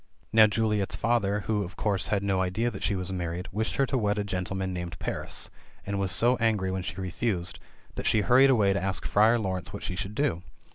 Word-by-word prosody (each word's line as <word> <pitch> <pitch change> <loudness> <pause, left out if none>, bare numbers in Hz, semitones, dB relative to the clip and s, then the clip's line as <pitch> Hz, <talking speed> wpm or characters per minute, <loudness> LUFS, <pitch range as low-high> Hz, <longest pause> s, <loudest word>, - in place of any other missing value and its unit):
Now 110 -1 +8
Juliet's 105 -2 0
father, 105 -3 +1
who, 105 +1 -1
of 90 0 -8
course, 100 -6 -1
had 100 -2 0
no 95 -2 +1
idea 95 +6 0
that 95 - -8
she 105 - 0
was 90 0 -3
mar 90 -2 -2
ried, 90 +2 -5
wished 110 +3 -2
her 135 - +3
to 130 0 -1
wed 105 -1 0
a 105 - 0
gentleman 95 -1 -3
named 85 -2 -5
Paris, - - -4 0.3
and 100 0 -2
was 95 -1 -1
so 120 +8 +3
angry 110 -5 +1
when 95 0 -2
she 85 +1 -6
refused, 90 -1 -2 0.3
that - - -3
she 110 - +3
hurried 130 +6 +5
away 105 -7 +4
to 100 - -1
ask 95 -1 -2
Friar 110 +3 +4
Laurence 95 -5 -3
what - - -6
she 90 - -3
should 95 +3 -5
do. 110 - 0
100 Hz, 230 wpm, -28 LUFS, 95-110 Hz, 0.3 s, Now